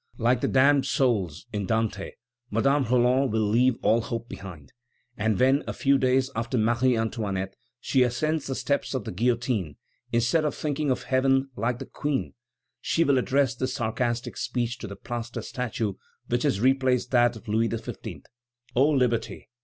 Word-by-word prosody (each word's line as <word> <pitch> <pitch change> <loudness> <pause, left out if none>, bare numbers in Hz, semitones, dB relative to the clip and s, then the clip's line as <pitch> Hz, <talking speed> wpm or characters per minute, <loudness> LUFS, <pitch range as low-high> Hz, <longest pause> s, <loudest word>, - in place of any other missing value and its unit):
Like 120 +1 +2
the - - +1
damned 140 +1 +4
souls 100 - 0
in 100 -2 -2
Dante, 110 -2 -1 0.4
Madame 135 +6 +2
Roland 125 +2 +3
will 110 -1 +1
leave 120 +4 +3
all 115 +2 +4
hope 115 +1 -5
behind, 90 -11 -10 0.4
and 110 -1 0
when, 135 +3 +4
a - - -2
few 140 0 +2
days 130 +1 +2
after 115 +3 -1
Marie 120 +2 +2
Antoinette, 100 -4 -2 0.2
she 130 0 +1
ascends 140 +5 0
the 135 - -2
steps 140 0 -1
of 130 - -2
the - - -5
guillotine, 115 - 0 0.4
instead 120 +7 +2
of 150 -3 -1
thinking 150 -1 -2
of 130 - 0
heaven, 135 +1 +2
like 120 +1 -1
the - - -7
Queen, 145 -3 -3 0.5
she 165 - +2
will 140 -4 +3
address 130 -1 +1
this 130 +2 -3
sarcastic 120 -1 -2
speech 120 0 -2
to 110 - -6
the 100 - -7
plaster 120 +1 -5
statue 115 -4 -3 0.3
which 120 0 0
has 130 -9 +1
replaced 130 0 +2
that 120 -1 +4
of 115 +1 -12
Louis 110 +2 +1
XV.: 115 - -6 0.5
"O 135 +4 +4
Liberty! 125 -6 0
120 Hz, 170 wpm, -26 LUFS, 115-135 Hz, 0.5 s, damned